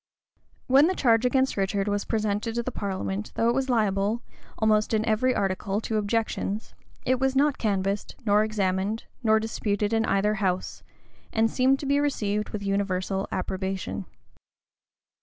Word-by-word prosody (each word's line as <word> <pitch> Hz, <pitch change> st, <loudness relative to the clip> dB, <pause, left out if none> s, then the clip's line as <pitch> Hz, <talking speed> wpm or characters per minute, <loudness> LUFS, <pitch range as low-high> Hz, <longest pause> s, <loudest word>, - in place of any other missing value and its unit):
When 275 Hz, +4 st, +6 dB
the 375 Hz, -, 0 dB
charge 235 Hz, -4 st, +3 dB
against 265 Hz, +1 st, +1 dB
Richard 195 Hz, 0 st, 0 dB
was 205 Hz, 0 st, -1 dB
presented 215 Hz, 0 st, -1 dB
to 235 Hz, -, 0 dB
the 255 Hz, -, -3 dB
parliament, 195 Hz, 0 st, -3 dB
though 230 Hz, -, +2 dB
it -, -, +3 dB
was 270 Hz, +1 st, -1 dB
liable, 210 Hz, -1 st, +1 dB, 0.3 s
almost 215 Hz, 0 st, +2 dB
in 215 Hz, 0 st, +1 dB
every 240 Hz, +4 st, +2 dB
article, 195 Hz, +1 st, -1 dB
to 220 Hz, -1 st, -2 dB
objections, 215 Hz, 0 st, -2 dB, 0.3 s
it 255 Hz, 0 st, +2 dB
was 265 Hz, 0 st, +1 dB
not 285 Hz, 0 st, +2 dB
canvassed, 200 Hz, -1 st, -1 dB
nor 210 Hz, 0 st, +4 dB
examined, 205 Hz, 0 st, -1 dB, 0.2 s
nor 220 Hz, -2 st, +4 dB
disputed 210 Hz, -1 st, -1 dB
in 225 Hz, 0 st, +2 dB
either 205 Hz, +1 st, +2 dB
house, 185 Hz, -2 st, -1 dB, 0.5 s
and 225 Hz, 0 st, +2 dB
seemed 265 Hz, +1 st, +3 dB
to -, -, -5 dB
be 280 Hz, +1 st, +2 dB
received 210 Hz, -8 st, -1 dB
with 205 Hz, -1 st, -5 dB
universal 195 Hz, -1 st, -1 dB
approbation. 185 Hz, -, -3 dB
215 Hz, 155 wpm, -26 LUFS, 195-235 Hz, 0.5 s, When